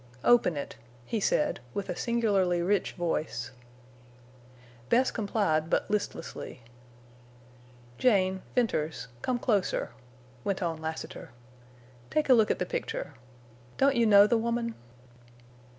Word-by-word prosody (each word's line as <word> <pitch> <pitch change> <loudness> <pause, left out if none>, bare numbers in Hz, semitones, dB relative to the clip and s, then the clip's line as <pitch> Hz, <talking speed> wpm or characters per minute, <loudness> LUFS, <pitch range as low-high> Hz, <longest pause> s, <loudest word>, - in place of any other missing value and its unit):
"Open 230 -10 +4
it," 140 - -6 0.3
he 225 - -2
said, 150 - +1 0.2
with 200 - -3
a - - -3
singularly 205 -7 +1
rich 195 +1 +1
voice. 155 -7 -2 1.4
Bess 255 +2 +3
complied, 195 -7 0
but - - 0
listlessly. 200 - -4 1.4
"Jane—Venters—come 185 - 0
closer," 210 -6 0 0.5
went 195 -1 -1
on 165 -2 -2
Lassiter. 160 0 -6 0.8
"Take 305 -2 0
a - - +9
look 220 -3 +4
at - - +1
the 180 - -1
picture. 145 - -4 0.6
Don't 275 0 +4
you 235 -1 +3
know 205 -1 +8
the 230 +2 +2
woman?" 235 0 -1
200 Hz, 110 wpm, -29 LUFS, 165-235 Hz, 1.4 s, a